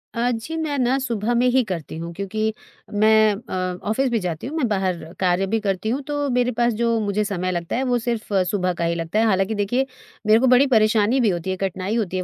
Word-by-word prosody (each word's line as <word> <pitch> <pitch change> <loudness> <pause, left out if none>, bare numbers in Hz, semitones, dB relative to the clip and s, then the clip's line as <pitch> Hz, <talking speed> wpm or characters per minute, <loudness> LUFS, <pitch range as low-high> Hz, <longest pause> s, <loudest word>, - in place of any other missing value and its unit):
अ, 240 +1 +1
जी, 240 +8 -4
मैं 290 -2 -2
ना 255 +2 +2
सुबह 235 -3 -1
में 245 +1 +3
ही 255 0 +3
करती 165 -4 -5
हूँ 170 +1 -6
क्योंकि 215 +4 -2 0.4
मैं 215 +1 +5
अ, 185 -4 -4
ऑफ़िस 265 +4 +1
भी 235 - +1
जाती 175 0 -4
हूँ, 300 - -6
मैं 260 -6 +1
बाहर 190 -5 -1 0.2
कार्य 185 +1 +2
भी 225 - +3
करती 195 0 -2
हूँ 265 +4 -1
तो 290 -1 -1
मेरे 250 0 +1
पास 240 -1 +3
जो 230 -1 +2
मुझे 210 0 0
समय 185 -3 -2
लगता 170 -1 -3
है, 260 - 0
वो 250 -1 +1
सिर्फ़ 230 -3 -3 0.2
सुबह 185 -3 0
का 170 - -4
ही 170 0 0
लगता 165 +5 -1
है। 225 - +3
हालाँकि 195 0 +1
देखिए, 245 +6 0 0.4
मेरे 220 +1 +6
को 260 - +3
बड़ी 255 +3 +5
परेशानी 220 +1 +3
भी 230 -5 +3
होती 175 +1 -2
है, - - -1
कठिनाई 190 +2 -2
होती 190 -5 -1
है 185 - -1
215 Hz, 240 wpm, -22 LUFS, 185-240 Hz, 0.4 s, मेरे